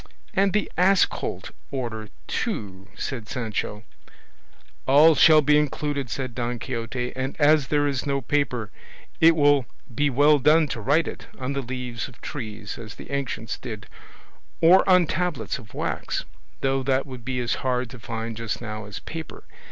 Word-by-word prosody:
"And 195 Hz, -1 st, +3 dB
the 210 Hz, +1 st, 0 dB
ass 190 Hz, 0 st, +6 dB
colt -, -, -5 dB, 0.2 s
order 115 Hz, -5 st, -4 dB, 0.2 s
too," 95 Hz, -1 st, -4 dB
added 115 Hz, -6 st, -4 dB
Sancho. 110 Hz, -3 st, -3 dB, 1.0 s
"All 150 Hz, +4 st, +7 dB
shall 155 Hz, 0 st, +7 dB
be 150 Hz, +1 st, +5 dB
included," 145 Hz, -2 st, -2 dB
said 130 Hz, +1 st, -4 dB
Don 120 Hz, 0 st, -2 dB
Quixote; 125 Hz, 0 st, -4 dB
"and 130 Hz, +1 st, -3 dB
as 150 Hz, -2 st, +5 dB
there 145 Hz, -1 st, +2 dB
is 140 Hz, -2 st, -1 dB
no 140 Hz, 0 st, +1 dB
paper, 125 Hz, -5 st, -1 dB, 0.5 s
it 165 Hz, 0 st, +7 dB
would 145 Hz, -3 st, +4 dB, 0.3 s
be 145 Hz, +5 st, +2 dB
well 145 Hz, +3 st, +5 dB
done 155 Hz, +3 st, +5 dB
to 115 Hz, -, -4 dB
write 145 Hz, +8 st, +2 dB
it -, -, -7 dB
on 130 Hz, +1 st, -3 dB
the 140 Hz, -, -1 dB
leaves 125 Hz, -2 st, -5 dB
of 125 Hz, -, -16 dB
trees, 110 Hz, -6 st, -6 dB
as 110 Hz, -3 st, -9 dB
the -, -, -11 dB
ancients 130 Hz, -5 st, -3 dB
did, 110 Hz, -4 st, -7 dB, 0.7 s
or 175 Hz, +3 st, +7 dB
on 180 Hz, -2 st, +6 dB
tablets 170 Hz, -4 st, -2 dB
of 110 Hz, -5 st, -14 dB
wax; -, -, -2 dB, 0.4 s
though 135 Hz, 0 st, +1 dB
that 130 Hz, 0 st, +1 dB
would 130 Hz, -4 st, -9 dB
be 130 Hz, +1 st, -2 dB
as 120 Hz, -1 st, 0 dB
hard 125 Hz, -1 st, 0 dB
to 125 Hz, -, -10 dB
find 115 Hz, 0 st, -5 dB
just 115 Hz, -2 st, -3 dB
now 110 Hz, -2 st, -6 dB
as 100 Hz, -, -7 dB
paper. 160 Hz, -1 st, -8 dB
130 Hz, 165 wpm, -25 LUFS, 115-145 Hz, 1.0 s, All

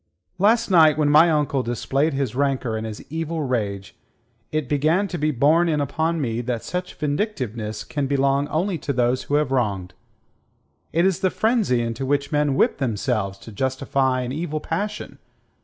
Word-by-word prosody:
"Last 220 Hz, +2 st, +3 dB
night 155 Hz, -4 st, +6 dB
when 150 Hz, -1 st, +2 dB
my 160 Hz, +3 st, +7 dB
uncle 150 Hz, -3 st, +1 dB
displayed 135 Hz, +5 st, -1 dB
his 135 Hz, -5 st, -1 dB
rancour 130 Hz, -4 st, 0 dB
and 110 Hz, 0 st, -3 dB
his 110 Hz, -1 st, -8 dB
evil 160 Hz, 0 st, -2 dB
rage, 105 Hz, -7 st, -3 dB, 0.6 s
it 155 Hz, -3 st, -1 dB
began 155 Hz, +8 st, +2 dB
to 175 Hz, -, -4 dB
be 150 Hz, +1 st, +1 dB
borne 155 Hz, +6 st, +3 dB
in 150 Hz, -2 st, +1 dB
upon 160 Hz, +4 st, -1 dB
me 120 Hz, -4 st, -1 dB
that 120 Hz, -2 st, -3 dB
such 180 Hz, 0 st, -4 dB
vindictiveness 130 Hz, -, -3 dB
can 145 Hz, -2 st, -3 dB
belong 140 Hz, +1 st, +1 dB
only 175 Hz, +3 st, -1 dB
to 140 Hz, -, -3 dB
those 125 Hz, 0 st, +1 dB
who 145 Hz, -, 0 dB
have 150 Hz, -2 st, +1 dB
wronged. 100 Hz, -8 st, -1 dB, 1.0 s
It 170 Hz, +2 st, +2 dB
is 190 Hz, -2 st, +2 dB
the 190 Hz, -, +2 dB
frenzy 215 Hz, -, +1 dB
into 115 Hz, +3 st, -3 dB
which 140 Hz, +2 st, 0 dB
men 150 Hz, -2 st, +1 dB
whip -, -, +2 dB
themselves 110 Hz, -5 st, -1 dB
to 115 Hz, -, -12 dB
justify 130 Hz, +2 st, 0 dB
an 125 Hz, 0 st, -4 dB
evil 155 Hz, +1 st, -3 dB
passion. 205 Hz, +8 st, -4 dB
140 Hz, 175 wpm, -23 LUFS, 125-160 Hz, 1.0 s, my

